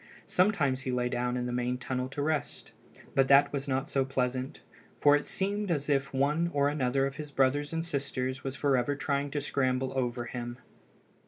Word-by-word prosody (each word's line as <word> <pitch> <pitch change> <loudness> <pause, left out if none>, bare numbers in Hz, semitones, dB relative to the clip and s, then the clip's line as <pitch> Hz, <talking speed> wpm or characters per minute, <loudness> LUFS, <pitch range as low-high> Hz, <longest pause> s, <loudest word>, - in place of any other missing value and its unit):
Sometimes 160 -9 +2
he 130 - -3
lay 125 0 0
down 125 0 -1
in 125 - -2
the 125 - -2
main 125 +1 -1
tunnel 130 0 -3
to 145 +1 -3
rest; 155 -1 -2 0.4
but 135 -1 +3
that 140 +1 +6
was 140 0 -3
not 135 -1 0
so 135 - +1
pleasant, 130 +1 -2 0.4
for 145 0 +6
it 145 - -1
seemed 200 +1 -1
as 150 -3 -1
if 135 -1 +1
one 150 +5 +1
or 140 0 +3
another 135 -2 +1
of 135 0 -4
his 150 -1 -6
brothers 140 +1 +1
and 165 0 -2
sisters 130 -4 -2
was 135 0 -4
forever 140 -1 +1
trying 140 0 -1
to 145 - -2
scramble 130 -2 0
over 120 -2 -1
him. 120 0 -5
135 Hz, 190 wpm, -30 LUFS, 130-145 Hz, 0.4 s, that